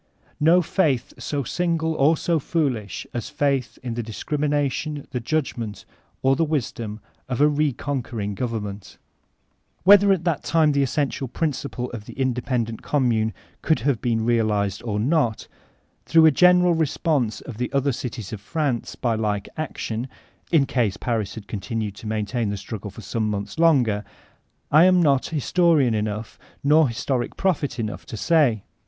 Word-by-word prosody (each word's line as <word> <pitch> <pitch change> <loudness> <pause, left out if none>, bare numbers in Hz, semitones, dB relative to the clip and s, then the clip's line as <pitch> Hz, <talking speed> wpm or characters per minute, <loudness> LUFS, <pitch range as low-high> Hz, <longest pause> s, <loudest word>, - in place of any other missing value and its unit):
No 170 +4 +5
faith 155 -8 0
so 145 -2 -2
sinq>le 165 +2 0
or 155 +3 +4
so 170 +1 +1
foolish 135 - -2
as 120 - -4
faith 140 -4 0
in 120 -2 -3
the 120 - -2
discrimination, 145 +4 -2
the 125 - -2
judgement, 115 - -3 0.4
or 135 0 +4
the 165 - +1
wisdom 120 -8 -3 0.3
of 125 - -2
a 145 - +6
re 150 0 +2
conquering 120 -6 -3
government 105 -3 -5 0.9
Whether 200 +1 +7
at 185 -4 +1
that 170 -4 0
time 160 -2 +3
the 140 -1 +2
essential 135 0 -1
principle 135 -3 -3
of 110 -3 -7
the - - -10
inde. 125 -2 0
pendent 115 -4 -2
0>mmune 115 -6 +1 0.3
could 155 -6 +1
have 135 -2 0
been 115 -2 0
realized 105 -4 +1
or 105 -3 -2
not, 120 -2 +1 0.6
through 165 -1 +6
a 160 - +7
general 180 +3 +5
response 150 -6 0
of 120 -5 -9
the 125 - -2
other 140 0 +1
cities 115 -4 -5
of 105 -2 -7
Prance 145 -3 -2
by 120 -2 0
like 105 -2 -1
action 125 -6 -4 0.4
(in 155 -5 +4
case 115 -8 0
Paris 110 -4 -2
had 105 -3 -9
continued 105 +2 -3
to 110 - -8
maintain 110 +1 -1
the 100 - -3
struggle 105 +1 -6
some 110 +2 -3
months 100 +8 -4
longer), 125 -11 +3 0.7
I 155 +4 +7
am 185 -1 +5
not 140 -6 +3
historian 155 -4 +2
enough, 105 +1 -3 0.2
nor 150 +1 +5
historic 120 +2 -2
prophet 150 -9 0
enough, 110 -3 -4
to 110 - -6
say. 135 - +2
125 Hz, 160 wpm, -23 LUFS, 110-155 Hz, 0.9 s, Whether